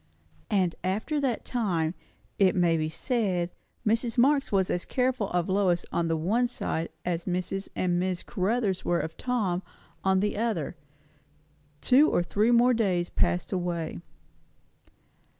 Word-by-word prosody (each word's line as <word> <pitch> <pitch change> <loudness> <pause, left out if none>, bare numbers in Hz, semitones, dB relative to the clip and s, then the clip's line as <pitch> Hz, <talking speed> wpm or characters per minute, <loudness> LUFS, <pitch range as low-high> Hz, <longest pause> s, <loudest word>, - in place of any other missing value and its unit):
And 190 -6 +2
after 220 - -1
that 255 -5 -1
time, 180 -10 0 0.5
it 190 -2 +4
may 175 -2 +3
be 155 -1 -1
said, 185 -3 -1 0.3
Mrs. 230 +2 +1
Marx 275 +3 +3
was 190 -2 +2
as 175 - -1
careful 250 -5 0
of 175 -1 0
Lois 190 -3 +1
on 170 - 0
the 165 0 0
one 220 +10 +1
side 165 -8 -3 0.2
as 170 -1 -2
Mrs. 185 +2 -2
and 175 -1 +1
Miss 185 -1 -1
Caruthers 200 -1 -1
were 175 -1 +1
of 160 0 -4
Tom 210 -8 -1 0.4
on 190 0 +3
the 205 +1 0
other. 220 -9 -1 1.1
Two 280 +5 +5
or 175 - +2
three 210 +6 +1
more 240 +1 +5
days 185 -7 0
passed 175 - 0
away. 175 - -2
190 Hz, 145 wpm, -27 LUFS, 175-230 Hz, 1.1 s, Two